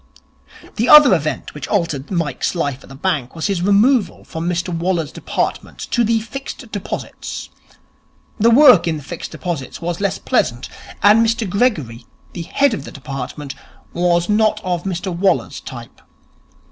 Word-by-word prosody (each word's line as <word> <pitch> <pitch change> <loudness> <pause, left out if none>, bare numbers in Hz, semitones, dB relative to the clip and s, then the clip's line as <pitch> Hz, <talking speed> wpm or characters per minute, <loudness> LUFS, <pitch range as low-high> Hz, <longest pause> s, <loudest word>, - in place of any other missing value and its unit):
The 230 - +1
other 300 -7 +9
event 155 -3 -2
which 150 - -7
altered 165 -9 -1
Mike's 165 -4 -2
life 145 -5 -2
in - - -16
the 135 - -10
bank 150 -4 -2
was 160 - -3
his 195 -4 0
removal 205 +2 +2
from 165 +2 -4
Mr 175 0 -2
Waller's 165 -3 -1
department - - -3
to 240 - +2
the 225 0 +2
Fixed 235 +1 -8
Deposits. 205 - -6 0.9
The 225 +3 +5
work 245 - +7
in 160 -2 0
the 150 - -9
Fixed 170 +4 -7
Deposits 160 -8 -5
was 175 +2 -4
less 200 -2 0
pleasant, 120 +1 -1 0.3
and 210 +3 +6
Mr 230 -1 0
Gregory, 155 - -1 0.3
the 175 - -5
head 275 +10 +1
of - - -4
the - - -9
department 140 0 -6 0.4
was 175 0 +1
not 215 0 +2
of 180 -2 -2
Mr 185 -1 -3
Waller's 180 -5 0
type. 120 -2 -10
175 Hz, 160 wpm, -19 LUFS, 155-210 Hz, 0.9 s, other